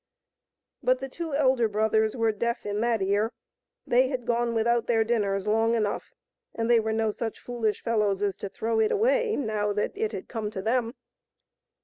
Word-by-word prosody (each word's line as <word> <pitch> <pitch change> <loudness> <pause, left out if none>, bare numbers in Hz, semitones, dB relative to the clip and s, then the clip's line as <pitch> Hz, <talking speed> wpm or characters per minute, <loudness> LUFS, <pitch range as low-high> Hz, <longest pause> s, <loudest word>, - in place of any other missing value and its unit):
But 255 +1 +3
the 270 +1 -5
two 320 +2 -5
elder 260 -5 +3
brothers 220 +2 +1
were 225 -1 +2
deaf 235 +3 -2
in 205 +1 -2
that 230 -3 +1
ear. 205 +4 +1 0.5
They 255 +2 +4
had 255 -3 -4
gone 235 -1 0
without 235 +1 +1
their 225 -2 +3
dinners 205 -3 0
long 225 +2 +2
enough, 215 -3 -2 0.4
and 225 0 -1
they 235 - +6
were 220 0 -1
no 220 0 +1
such 225 +1 -4
foolish 230 -3 -2
fellows 210 -3 +1
as 200 -2 0
to 200 - -5
throw 225 +3 -1
it 220 - +3
away, 480 +1 +2
now 215 -5 -1
that 210 - -1
it 435 +1 -1
had - - -6
come 220 -3 -4
to 200 -3 -5
them. 235 +2 0
225 Hz, 190 wpm, -27 LUFS, 215-240 Hz, 0.5 s, they